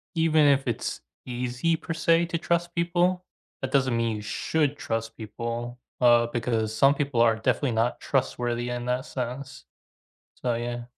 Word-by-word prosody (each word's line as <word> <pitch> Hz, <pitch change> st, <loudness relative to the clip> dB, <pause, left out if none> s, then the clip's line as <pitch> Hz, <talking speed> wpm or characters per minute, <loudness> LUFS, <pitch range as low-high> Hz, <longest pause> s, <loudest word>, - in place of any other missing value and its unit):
even 160 Hz, -2 st, +4 dB
if 140 Hz, -1 st, +4 dB
it's 120 Hz, -, -2 dB, 0.2 s
easy 125 Hz, +6 st, -1 dB
per 165 Hz, +1 st, -5 dB
se 165 Hz, +1 st, +3 dB
to 170 Hz, 0 st, -1 dB
trust 170 Hz, +1 st, -1 dB
people, 175 Hz, +1 st, +1 dB, 0.4 s
that 130 Hz, 0 st, -3 dB
doesn't 130 Hz, -3 st, +2 dB
mean 115 Hz, -1 st, 0 dB
you 105 Hz, -, -5 dB
should 145 Hz, +7 st, -1 dB
trust 115 Hz, -5 st, -3 dB
people, 115 Hz, +2 st, -5 dB, 0.2 s
uh, 120 Hz, -1 st, +6 dB
because 115 Hz, -2 st, -1 dB
some 135 Hz, +5 st, +5 dB
people 140 Hz, -4 st, -1 dB
are 115 Hz, -1 st, +5 dB
definitely 120 Hz, +4 st, 0 dB
not 115 Hz, +2 st, 0 dB
trustworthy 120 Hz, -3 st, -1 dB
in 120 Hz, 0 st, -3 dB
that 125 Hz, +1 st, -1 dB
sense, 130 Hz, +2 st, -6 dB, 0.7 s
so, 120 Hz, -1 st, -1 dB
yeah. 120 Hz, 0 st, -4 dB
125 Hz, 160 wpm, -26 LUFS, 120-150 Hz, 0.7 s, uh